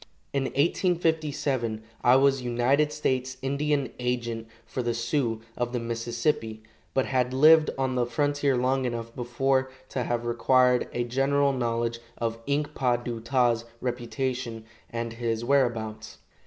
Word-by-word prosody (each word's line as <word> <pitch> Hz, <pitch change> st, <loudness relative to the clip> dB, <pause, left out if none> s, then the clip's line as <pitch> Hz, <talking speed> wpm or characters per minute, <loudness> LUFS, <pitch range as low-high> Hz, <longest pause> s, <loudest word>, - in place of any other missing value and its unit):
In 135 Hz, -1 st, +1 dB
1857 145 Hz, -, 0 dB, 0.2 s
I 125 Hz, -, +6 dB
was 135 Hz, 0 st, +4 dB
United 125 Hz, +5 st, +2 dB
States 130 Hz, -3 st, -1 dB
Indian 140 Hz, 0 st, 0 dB
agent 120 Hz, -2 st, -2 dB, 0.2 s
for 130 Hz, -, -4 dB
the 120 Hz, -1 st, -1 dB
Sioux 115 Hz, -1 st, -1 dB
of 120 Hz, 0 st, -2 dB
the 125 Hz, -, 0 dB
Mississippi, 115 Hz, 0 st, -2 dB, 0.3 s
but 135 Hz, -, +3 dB
had 130 Hz, -1 st, 0 dB
lived 155 Hz, +3 st, +7 dB
on 130 Hz, -1 st, 0 dB
the 125 Hz, -1 st, +1 dB
frontier 145 Hz, +2 st, +1 dB
long 130 Hz, +1 st, +1 dB
enough 115 Hz, -1 st, -4 dB
before 130 Hz, +2 st, 0 dB, 0.2 s
to 130 Hz, -, -2 dB
have 120 Hz, 0 st, -2 dB
acquired 125 Hz, +1 st, +3 dB
a 120 Hz, -, -1 dB
general 135 Hz, +3 st, +2 dB
knowledge 115 Hz, -2 st, -1 dB, 0.2 s
of 115 Hz, -1 st, -2 dB
Ink 145 Hz, +1 st, 0 dB
pa 125 Hz, -3 st, +2 dB
du 120 Hz, -1 st, -4 dB
ta's 120 Hz, -1 st, +2 dB, 0.2 s
reputation 125 Hz, -1 st, -3 dB, 0.2 s
and 115 Hz, 0 st, -4 dB
his 115 Hz, 0 st, -2 dB
whereabouts. 115 Hz, -5 st, 0 dB
125 Hz, 140 wpm, -27 LUFS, 115-135 Hz, 0.3 s, lived